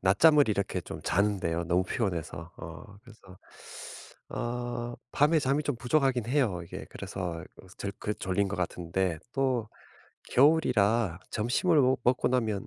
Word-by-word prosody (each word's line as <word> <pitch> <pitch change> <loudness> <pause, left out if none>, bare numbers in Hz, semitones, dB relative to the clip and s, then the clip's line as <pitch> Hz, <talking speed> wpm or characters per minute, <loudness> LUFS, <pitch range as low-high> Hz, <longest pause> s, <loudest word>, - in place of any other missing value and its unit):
낮잠을 145 - +5
이렇게 100 -3 0
좀 - - -8
자는데요 95 -4 +1
너무 90 +2 +2
피곤해서. 85 - -3
어 80 +5 -9 0.2
그래서 105 -6 -16 0.9
어 120 0 -3 0.2
밤에 155 +3 +4
잠이 140 +1 +1
좀 145 - -1
부족하긴 125 -1 +1
해요 125 -10 +1
이게. 85 - -8
그래서 85 -4 -5
그 - - -15
졸 100 - -3
그 105 - -2
졸린 95 +1 0
것 100 - -3
같은데 90 -1 -1
또 130 -5 0 0.6
겨울이라 115 - +3
점심을 140 - +2
먹 130 0 +3
먹고 125 0 +3
나면 110 -6 0
110 Hz, 285 characters per minute, -29 LUFS, 95-130 Hz, 0.9 s, 낮잠을